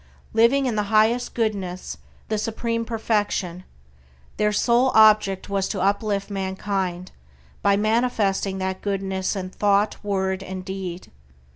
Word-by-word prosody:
Living 235 +5 +4
in 245 -4 0
the 210 -1 0
highest 225 +3 +2
Goodness, 195 -6 -3 0.3
the 215 -1 -1
supreme 230 +1 -2
Perfection, 205 -6 -1 0.7
their 210 0 +2
sole 240 +4 +3
object 210 -3 +5
was 195 -1 -1
to 200 - -3
uplift 200 +1 0
mankind 190 -2 -3 0.5
by 200 0 +3
manifesting 210 -3 +1
that 190 0 -3
Goodness 195 -1 -2
in 185 -1 -5
thought, 205 +2 +1
word, 190 -2 -1
and 190 -1 -7
deed. 190 -2 -6
200 Hz, 125 wpm, -23 LUFS, 190-220 Hz, 0.7 s, object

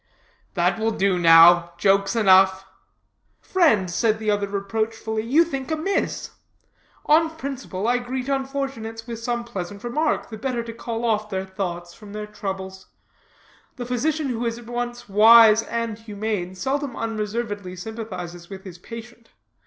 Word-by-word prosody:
"That - - +1
will 220 +1 +1
do 195 -4 +1
now. 170 +1 +7
Jokes 195 +3 +2
enough." 190 -3 +5 0.7
"Friend," 270 - +2
said 215 +5 +1
the 215 -1 0
other 205 -1 0
reproachfully, 220 +2 -2
"you 270 +9 +4
think 275 -5 -5
amiss. 320 +5 -2 0.7
On 320 +2 +4
principle, 270 -10 -5
I 245 +1 +2
greet 250 +1 -4
unfortunates 270 -5 -3
with 230 -2 -6
some 240 0 -2
pleasant 200 -4 -7
remark, 300 +3 -1
the 220 - -7
better 245 -1 -2
to 230 0 -7
call 230 0 -4
off 215 -2 0
their 190 -1 -3
thoughts 175 -3 -5
from 210 -2 -13
their 210 0 -5
troubles. 190 -2 -6 0.9
The 245 - -6
physician 280 +4 -1
who 240 -1 -2
is 230 -1 -2
at 240 - -12
once 240 0 -5
wise 220 +2 +7
and 230 -1 -4
humane 210 -4 -4
seldom 270 +3 -2
unreservedly 210 -3 -4
sympathizes 180 -4 -7
with 190 -1 -9
his 180 -3 -10
patient. 230 +3 -11
225 Hz, 145 wpm, -23 LUFS, 195-240 Hz, 0.9 s, now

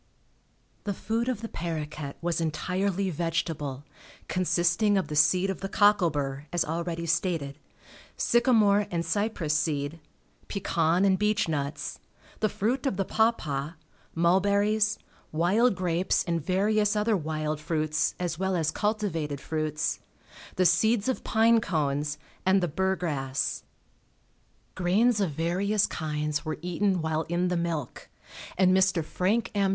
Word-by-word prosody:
The 200 -2 -2
food 230 +5 -1
of 235 -4 -2
the 230 - -4
paroquet 150 -6 -5
was 170 0 -1
entirely 185 +4 -1
vegetable, 160 -4 -2 0.4
consisting 185 +3 +2
of 185 -5 -1
the 150 - -3
seed 180 +6 +4
of 190 - -7
the 195 - -3
cockle 205 -4 +4
bur, 140 -1 -4
as 175 - +1
already 170 +1 -3
stated, 165 -4 -1 0.6
sycamore 215 -4 +3
and 170 -1 -2
cypress 180 -3 -1
seed, 150 0 -1 0.5
pecan 175 -2 +1
and 190 -1 +3
beech 210 -1 +1
nuts, 145 -2 -3 0.4
the 215 - +1
fruit 250 +8 -1
of 200 - -1
the 195 - 0
pawpaw, 160 -11 0 0.4
mulberries, 200 +5 +2 0.3
wild 195 +9 +3
grapes 180 0 0
and 170 -3 -2
various 205 +4 +2
other 210 +1 +2
wild 155 -2 -2
fruits 155 -1 0
as 175 -2 -3
well 190 0 0
as 160 -3 +1
cultivated 185 -10 -2
fruits, 155 +1 -2 0.6
the 185 - +2
seeds 220 +6 +3
of 260 - -2
pine 225 +1 +4
cones 150 -4 -1 0.3
and 190 +1 +4
the 175 - 0
burgrass. 160 -6 -1 1.1
Grains 205 +5 +2
of 190 - +1
various 180 +7 +1
kinds 150 -1 -2
were 155 -1 -3
eaten 180 0 0
while 160 0 0
in 175 +1 +1
the 180 - 0
milk, 170 -6 -3 0.5
and 185 0 +4
Mr. 190 -4 +2
Frank 215 +8 0
M. 200 -1 +2
175 Hz, 135 wpm, -27 LUFS, 155-200 Hz, 1.1 s, seed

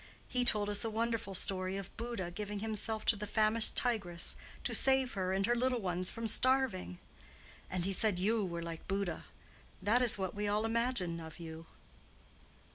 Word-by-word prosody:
He 250 -1 -1
told 210 -4 +2
us 205 0 +1
a 225 - -2
wonderful 225 -2 -2
story 185 +1 -1
of 195 -1 -8
Buddha 230 -7 -5
giving 210 +3 -5
himself 220 +1 0
to - - +4
the 210 +1 -6
famished 215 +1 +5
tigress 200 -9 0 0.3
to - - -2
save 265 -1 +3
her 185 -2 -2
and 195 +1 0
her 240 - +2
little 250 +1 0
ones 180 -2 0
from 230 - -5
starving. 250 - +1 0.7
And 180 -1 -2
he 195 - -1
said 200 0 +4
you 215 +4 +1
were 170 -2 -4
like 165 -1 -8
Buddha. 195 -4 -3 0.5
That 230 +5 +2
is 245 -4 +7
what 190 -2 -3
we 205 0 -3
all 210 +2 0
imagine 225 -7 -1
of 160 -1 -10
you." 160 -1 -9
205 Hz, 180 wpm, -33 LUFS, 185-230 Hz, 0.7 s, is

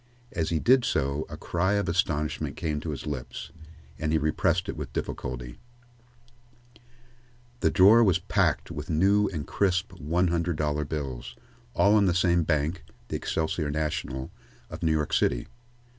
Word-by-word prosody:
As 80 -2 -1
he 85 - +1
did 125 +8 +4
so, 70 - 0
a - - -7
cry 90 +3 0
of 100 -1 0
astonishment 85 -4 -1
came 75 -2 -2
to 80 - -5
his 75 - -5
lips, 75 -5 -5 0.5
and 75 0 -1
he 80 - +3
repressed 85 +4 +1
it - - -3
with - - -6
difficulty, - - -5 2.0
The - - +3
drawer 105 +5 +7
was 95 -6 +4
packed - - 0
with 75 +3 -6
new 100 +6 +3
and 80 -6 -4
crisp 95 0 0
one 90 +2 0
hundred 85 0 0
dollar 75 0 0
bills, 65 -5 -5 0.4
all 100 - +5
on 105 -2 +5
the 85 - +2
same 85 -1 +3
bank, 75 +2 0 0.3
the - - -3
Excelsior 80 -1 -1
National, 75 -3 -3 0.4
of - - -7
New 80 - +2
York 75 -1 0
City. - - +2
80 Hz, 160 wpm, -27 LUFS, 75-90 Hz, 2.0 s, drawer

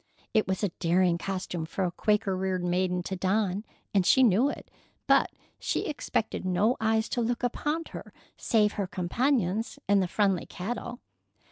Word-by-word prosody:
It 215 - +3
was 190 +2 -2
a 205 - +2
daring 175 0 +2
costume 185 -3 -4
for 190 - -2
a 180 - 0
Quaker 210 0 +1
reared 185 -1 -1
maiden 180 0 0
to 190 - -4
don, 195 +1 0 0.3
and 195 -2 +4
she 260 +8 +5
knew 235 +4 +4
it, - - -8 0.3
but - - +4 0.3
she - - -1
expected 245 -8 -2
no 185 +6 +2
eyes 220 0 +2
to 245 - -1
look 235 +1 -1
upon 295 +6 -1
her - - -8 0.2
save 210 -3 +2
her 200 -3 -3
companions 215 +2 0
and 200 0 +4
the 185 - 0
friendly 195 -1 +1
cattle. 240 +5 -5
195 Hz, 165 wpm, -28 LUFS, 185-225 Hz, 0.3 s, she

